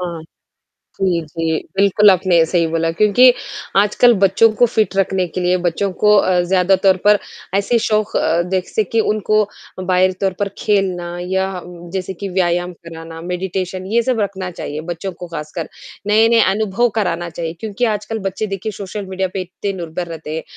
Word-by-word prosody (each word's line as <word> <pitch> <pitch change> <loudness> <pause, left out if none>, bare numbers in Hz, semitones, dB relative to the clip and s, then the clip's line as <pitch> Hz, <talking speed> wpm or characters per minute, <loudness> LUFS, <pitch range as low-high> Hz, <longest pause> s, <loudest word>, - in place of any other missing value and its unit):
हाँ। 170 -3 -5 0.8
जी, 180 -3 +1
जी, 160 +1 -2 0.2
बिल्कुल 200 +1 +5
आपने 180 -2 +3
सही 170 -1 +1
बोला 165 0 0
क्योंकि 215 +7 +5 0.4
आजकल 210 +4 +5
बच्चों 200 +4 +5
को 240 +3 +4
फिट 215 -5 0
रखने 190 -1 +1
के 180 +2 -5
लिए 180 0 +2
बच्चों 195 +4 0
को 210 0 +5
अ, 185 -3 +3
ज़्यादातर 190 +1 +3
पर 210 0 +6 0.4
ऐसे 200 +4 +2
शौक 215 -1 0
अ, 170 +1 +2
देख 185 0 -2
सके 220 +1 0
उनको 215 0 +2 0.4
बाहरी 185 0 +2
तौर 195 -1 +1
पर 200 - +1
खेलना 195 -4 0 0.2
या 190 +1 0 0.5
जैसे 190 0 -3
कि 200 +3 -6
व्यायाम 175 -1 0
कराना 165 0 -9
मेडिटेशन 185 +1 -4
ये 235 +1 +3
सब 245 -2 0
रखना 190 -2 -3
चाहिए 155 -3 -6
बच्चों 180 +3 -4
को 180 0 -9
खासकर। 155 0 -6 0.4
नए-नए 225 +2 +4
अनुभव 215 +4 +1
कराना 175 -4 -1
चाहिए 165 0 -4
क्योंकि 220 +2 -2
आजकल 215 +2 -4
बच्चे 195 +3 -2
देखिए 200 +2 -4
सोशल 200 0 -6
मीडिया 190 0 -2
पे 195 - -2
इतने 185 +2 -5
निर्भर 175 -1 -5
रहते 160 -2 -6
हैं, 160 - -3
190 Hz, 170 wpm, -18 LUFS, 175-205 Hz, 0.8 s, पर